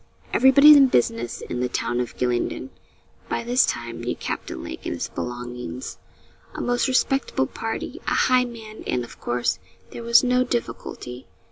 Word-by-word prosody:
Everybody 265 +3 +7
'in 275 -2 +7
business' 120 - 0
in 125 - -5
the 125 0 0
town 120 - -1
of 125 - -4
Gylingden, 125 - -1 0.6
by - - -1
this 245 +2 +3
time, 120 0 -4
knew 125 - -2
Captain 65 - -5
Lake 65 - -7
and - - -3
his - - -4
belongings 120 0 -6 0.6
a - - -5
most 245 +2 +1
respectable 270 +1 +1
party - - -5
a - - +1
high 255 -1 +4
man; 220 -3 -10
and, 125 - 0
of 120 - -12
course, 120 0 -1 0.3
there - - -7
was 235 +1 +5
no 250 0 +3
difficulty. 180 - -5
125 Hz, 160 wpm, -23 LUFS, -, 0.6 s, Everybody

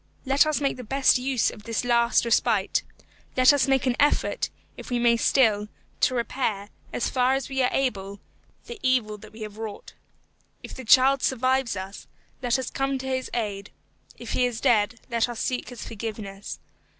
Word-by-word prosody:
Let 275 +3 +4
us 305 -2 +1
make 275 -3 -1
the 250 - -7
best 270 +2 +3
use 255 -2 +1
of 210 - -12
this 230 +2 -3
last 235 0 +3
respite; 220 -3 +2 0.6
let 255 +2 +7
us 285 -1 +2
make 270 -1 +2
an 250 -2 +1
effort, 295 +11 +1 0.3
if - - -10
we 240 -1 +3
still 225 -4 +3
may, 210 - -7 0.3
to 255 - +2
repair, 230 -4 -2 0.2
as - - -1
far 255 0 +2
as 270 -1 -3
we 265 -1 -1
are 250 - +3
able, 200 -7 -2 0.5
the 475 -2 -9
evil 240 -6 +1
that 215 0 -13
we 220 +1 -13
have 215 0 -7
wrought. 220 -2 -7 0.7
If - - -8
the 260 - -9
child 265 +3 +5
survives 260 -2 +1
us, 190 +1 -8 0.3
let 245 0 +1
us 260 -2 -4
come 270 0 -1
to 265 - -7
his 260 -1 -2
aid; 205 -4 -3 0.5
if - - -8
he 250 - +1
is 235 -2 -5
dead, 225 +1 +2
let 235 +1 +1
us 235 -2 -6
seek 250 -1 -2
his 245 -3 -8
forgiveness. 210 -3 -6
245 Hz, 185 wpm, -25 LUFS, 215-265 Hz, 0.7 s, let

